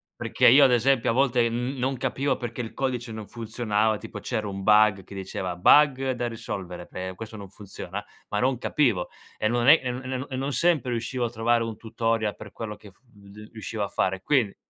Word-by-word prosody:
Perché - - +2
io 135 +5 +8
ad 130 - +6
esempio 125 +1 +3
a - - +2
volte 125 -2 +2
n 125 +4 -3
non 130 +1 -1
capivo 135 +3 -1
perché 120 -1 -5
il 115 - -7
codice 125 -3 -2
non 110 -2 -7
funzionava, 110 -2 -1
tipo - - -8
c'era 110 -4 -3
un 100 -1 -5
bug 105 -1 +5
che 100 - -12
diceva: 95 -1 -4
"Bug 135 +6 +5
da 120 -1 -2
risolvere, 95 -6 -6
ehm, 95 0 -5
questo 110 +1 -8
non 100 -2 -9
funziona". 100 0 -8 0.3
Ma 105 - -1
non 130 +2 +1
capivo 120 -11 +1 0.3
e 110 - +1
non 120 +1 +1
è 155 +3 +8
e 125 - -2
n 125 +1 -5
e 130 0 -3
n 130 - -5
e 130 - -4
non 135 +2 -2
sempre 150 -3 +2
riuscivo 120 +1 -2
a 115 - -2
trovare 120 0 +1
un 115 -1 -4
tutorial 115 -1 -1
per 105 -2 -11
quello 105 -2 -6
che 105 - -15
f 95 - -28
v 105 -2 -15
riuscivo 110 -1 -4
a 100 - -3
fare. 95 0 -1
Quindi 120 -5 +1
115 Hz, 220 wpm, -26 LUFS, 105-125 Hz, 0.3 s, io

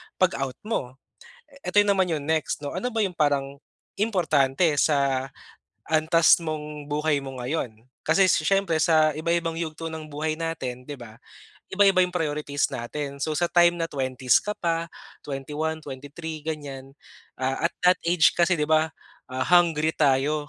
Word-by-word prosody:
'pag 185 -1 +3
out 135 -2 -3
mo. 135 - -3 0.7
Ito 205 +3 +4
naman 195 -2 +2
yung 155 -4 -2
next 155 -1 -1
'no, 145 - -4
ano 185 +8 -3
ba 225 -3 0
yung 185 -3 -2
parang 140 -3 0 0.4
importante 160 -9 +1 0.2
sa 140 -3 +2 0.6
antas 160 +2 +4
mong 150 -2 -5
buhay 150 0 +1
mo 135 -1 -7
ngayon? 125 -4 -4 0.2
Kasi 195 - +4
s - - +3
siyempre 195 -5 +2
sa 155 -1 +4
iba-ibang 170 +1 0
yugto 165 0 -5
ng 160 -1 -7
buhay 155 +1 -2
natin, 135 -7 -4
'di 145 - -5
ba, 115 -3 -12 0.6
iba-iba 195 -1 +5
yung 180 - -4
priorities 150 -3 -1
natin. 140 +4 -5
So, 155 - -1
sa 175 - +2
time 175 0 +4
na 165 - 0
20s 130 -3 +1
ka 210 - -2
pa, 170 -1 -1 0.4
21, 150 +3 -3
23 145 +3 -7
ganiyan, 140 -4 -6 0.5
ah, 130 +4 -2
at - - -36
that 180 - +5
age 170 -1 +4
kasi, 175 +1 +3
'di 150 - 0
ba, 155 0 +3 0.4
ah, 130 +1 -2
hungry 165 -3 +3
tayo 145 +1 +1
155 Hz, 160 wpm, -25 LUFS, 140-170 Hz, 0.7 s, iba-iba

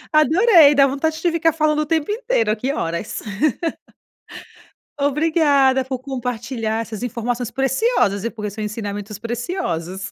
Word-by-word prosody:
Adorei! 320 -1 +6
Dá 275 -1 +6
vontade 310 +4 -1
de 345 0 +1
ficar 330 0 +2
falando 305 -1 +1
o 305 - 0
tempo 320 +3 0
inteiro, 435 - 0
aqui, 240 +6 -1
horas. 170 - -4 1.8
Obrigada, 285 -2 +3
por 260 -1 -4
compartilhar 240 -3 -3
essas 220 -1 -7
informações 245 0 -3
preciosas 265 - +1
e 230 - -1
por 215 -2 -7
seus 215 +1 -5
ensinamentos 205 -1 -5
preciosos. 220 - -4
260 Hz, 130 wpm, -20 LUFS, 220-310 Hz, 1.8 s, Adorei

